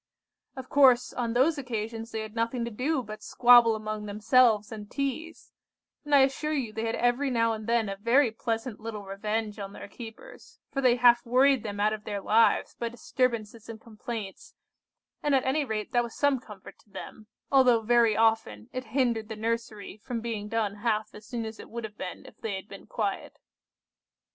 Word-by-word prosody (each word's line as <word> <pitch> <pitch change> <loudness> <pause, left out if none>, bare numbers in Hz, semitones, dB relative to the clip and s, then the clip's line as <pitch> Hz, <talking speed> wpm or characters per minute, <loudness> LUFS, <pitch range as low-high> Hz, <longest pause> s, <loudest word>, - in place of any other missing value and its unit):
"Of 260 -1 -8
course, 260 -4 +4
on 235 -2 -2
those 285 +5 +3
occasions 225 -3 -4
they 220 - -3
had 215 -1 -7
nothing 230 +1 -1
to 235 - -5
do 260 +5 -1
but 215 -1 -9
squabble 240 -2 +6
among 215 -1 -5
themselves 215 +1 +3
and 210 -2 -8
teaze; 280 +4 -4 0.5
and 295 -1 +2
I 275 - +7
assure 275 +3 +1
you 250 -7 -2
they 220 +1 -3
had 225 - -1
every 245 +4 +1
now 230 -2 +2
and 215 0 -7
then 230 -2 +2
a 195 0 -4
very 235 +4 +3
pleasant 225 0 -3
little 215 -2 -6
revenge 210 +2 -3
on 200 0 -6
their - - -9
keepers, 230 - -12
for 275 - -2
they 250 -2 +4
half 240 -1 +5
worried 260 +2 +4
them 205 -2 -6
out 210 +1 +2
of 215 -1 -6
their 205 -2 -4
lives 220 +3 +3
by 235 - -4
disturbances 230 -2 -2
and 225 -1 -7
complaints, 220 -2 -8 0.7
and 290 -2 +2
at 265 - +1
any 280 +3 +1
rate 220 -5 -4
that 240 - +3
was 235 -1 -6
some 285 -2 +2
comfort 210 -5 -13
to - - -27
them, 215 +1 -10 0.2
although 255 -4 +5
very 230 -1 +3
often 220 - +1
it 255 0 -4
hindered 235 -4 +1
the 220 - -5
nursery 220 -2 -4
from 230 +2 -5
being 225 -3 -4
done 215 -2 -1
half 215 0 -1
as 210 +1 -13
soon 235 -2 -4
as 220 0 -8
it - - -11
would 235 0 -6
have 210 -1 -8
been 185 - -6
if - - -16
they 220 -4 -3
had 190 +1 -7
been 195 - -12
quiet. 205 -4 -3
230 Hz, 195 wpm, -28 LUFS, 215-245 Hz, 0.7 s, I